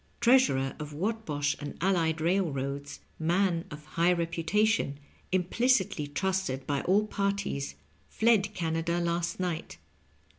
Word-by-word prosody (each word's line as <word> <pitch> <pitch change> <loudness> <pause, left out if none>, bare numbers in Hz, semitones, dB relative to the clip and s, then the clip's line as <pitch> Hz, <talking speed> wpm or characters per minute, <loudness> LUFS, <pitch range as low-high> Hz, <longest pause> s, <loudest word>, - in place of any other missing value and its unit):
Treasnrer 235 - +4
of 150 0 -6
Whatbosh 155 -5 -1
and 145 - -6
allied 165 -3 +1
railroads, 145 -6 -1 0.2
man 170 +1 +1
of 150 0 -9
high 170 +3 +2
reputation, 170 0 +1 0.3
implicitly 190 - +1
trusted 185 -4 -1
bj 145 +3 -2
all 205 +3 +4
parties, 200 -9 -2 0.3
fled 220 -3 +3
Canada 165 +1 -1
last 170 0 -1
night. 175 -3 -3
170 Hz, 110 wpm, -29 LUFS, 150-195 Hz, 0.3 s, Treasnrer